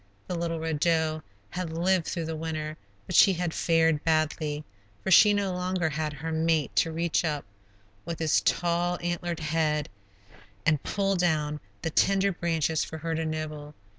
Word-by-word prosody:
The -, -, -4 dB
little 170 Hz, -1 st, -2 dB
Red 160 Hz, -2 st, -2 dB
Doe 160 Hz, -1 st, +1 dB, 0.3 s
had 180 Hz, -3 st, -4 dB
lived 175 Hz, +1 st, +1 dB
through 170 Hz, -3 st, -2 dB
the 160 Hz, 0 st, -3 dB
winter, 155 Hz, -1 st, -4 dB, 0.3 s
but -, -, -4 dB
she 195 Hz, -, +7 dB
had 175 Hz, -2 st, -2 dB
fared 165 Hz, -2 st, +2 dB
badly, 155 Hz, -1 st, 0 dB, 0.4 s
for 190 Hz, -, -1 dB
she 210 Hz, +3 st, +8 dB
no 200 Hz, -2 st, 0 dB
longer 180 Hz, -2 st, -1 dB
had 155 Hz, 0 st, -2 dB
her 150 Hz, +3 st, -5 dB
mate 160 Hz, -2 st, +1 dB
to 165 Hz, -, +3 dB
reach 165 Hz, +1 st, 0 dB
up, 150 Hz, -3 st, -2 dB, 0.6 s
with 170 Hz, 0 st, -5 dB
his 160 Hz, -2 st, +2 dB
tall, 175 Hz, 0 st, +1 dB
antlered 175 Hz, -1 st, -2 dB
head, 150 Hz, -1 st, 0 dB, 0.8 s
and 155 Hz, -3 st, +3 dB
pull 195 Hz, -1 st, 0 dB
down 155 Hz, -4 st, 0 dB, 0.2 s
tender 195 Hz, +4 st, +2 dB
branches 165 Hz, -3 st, 0 dB
for 160 Hz, -, -6 dB
her 165 Hz, +1 st, -3 dB
to 160 Hz, 0 st, -1 dB
nibble. 155 Hz, -1 st, -5 dB
160 Hz, 165 wpm, -27 LUFS, 155-175 Hz, 0.8 s, she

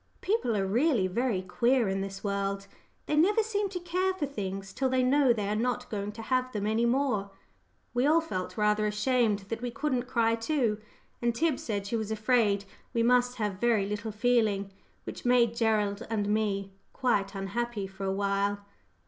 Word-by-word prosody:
People 385 Hz, -, 0 dB
are 195 Hz, -, +1 dB
really 235 Hz, -, +2 dB
very 200 Hz, 0 st, 0 dB
queer 235 Hz, +5 st, +2 dB
in 195 Hz, 0 st, -1 dB
this 195 Hz, 0 st, -6 dB
world 200 Hz, -1 st, -2 dB, 0.4 s
they 300 Hz, -, 0 dB
never 405 Hz, +8 st, +4 dB
seem 415 Hz, -2 st, -1 dB
to 370 Hz, -2 st, -4 dB
care 365 Hz, +2 st, 0 dB
for 330 Hz, -6 st, -1 dB
things 195 Hz, -7 st, -5 dB
till 265 Hz, -1 st, 0 dB
they 255 Hz, 0 st, +2 dB
know 270 Hz, 0 st, +4 dB
they 210 Hz, -4 st, 0 dB
are 210 Hz, -, 0 dB
not 250 Hz, +2 st, -1 dB
going 205 Hz, -1 st, -3 dB
to 225 Hz, +1 st, -8 dB
have 255 Hz, +1 st, 0 dB
them 205 Hz, -1 st, -2 dB
any 220 Hz, +2 st, +2 dB
more. 240 Hz, -6 st, +1 dB, 0.6 s
We 250 Hz, +3 st, +2 dB
all 315 Hz, +2 st, +5 dB
felt 185 Hz, -, -4 dB
rather 210 Hz, 0 st, +2 dB
ashamed 210 Hz, 0 st, +1 dB
that 230 Hz, 0 st, -3 dB
we 245 Hz, -, -2 dB
couldn't 255 Hz, -1 st, -2 dB
cry 230 Hz, -2 st, +2 dB
too, 230 Hz, -2 st, 0 dB, 0.4 s
and 235 Hz, -1 st, +1 dB
Tib 315 Hz, +1 st, +1 dB
said 200 Hz, -3 st, -3 dB
she 205 Hz, -, -2 dB
was 220 Hz, -1 st, -3 dB
afraid 215 Hz, -2 st, +2 dB, 0.3 s
we 230 Hz, -, +3 dB
must 245 Hz, +1 st, +3 dB
have 210 Hz, -5 st, -2 dB
very 230 Hz, -4 st, +3 dB
little 210 Hz, +2 st, -3 dB
feeling, 210 Hz, -3 st, +1 dB, 0.3 s
which -, -, -7 dB
made 245 Hz, -2 st, +4 dB
Gerald 215 Hz, -2 st, 0 dB
and 210 Hz, -3 st, -1 dB
me 200 Hz, -2 st, 0 dB, 0.2 s
quite 205 Hz, -6 st, 0 dB
unhappy 205 Hz, +2 st, -3 dB
for 195 Hz, 0 st, -9 dB
a 190 Hz, -, 0 dB
while. 200 Hz, +1 st, 0 dB
225 Hz, 185 wpm, -29 LUFS, 200-250 Hz, 0.6 s, all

